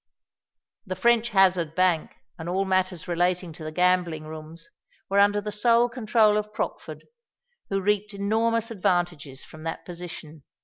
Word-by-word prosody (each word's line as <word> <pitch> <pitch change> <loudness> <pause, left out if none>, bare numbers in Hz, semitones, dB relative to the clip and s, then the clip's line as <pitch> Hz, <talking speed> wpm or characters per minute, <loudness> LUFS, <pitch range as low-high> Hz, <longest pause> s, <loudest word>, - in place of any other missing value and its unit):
The 185 -3 -5
French 235 +4 +3
Hazard 185 -6 +3
Bank 180 -4 +2 0.3
and 160 +1 -5
all 190 +2 0
matters 185 -2 0
relating 175 0 0
to 160 - -10
the 155 - -5
gambling 180 -2 +1
rooms 160 +1 -10 0.4
were 200 - +4
under 205 +1 +4
the 210 +1 -5
sole 235 +3 +3
control 220 -3 +3
of 210 0 -3
Crockford, - - -5 0.6
who 195 - 0
reaped 205 +1 0
enormous 225 +3 0
advantages 175 -8 -1
from 155 - -13
that 165 0 -5
position. 170 -3 -9
185 Hz, 145 wpm, -25 LUFS, 170-210 Hz, 0.6 s, were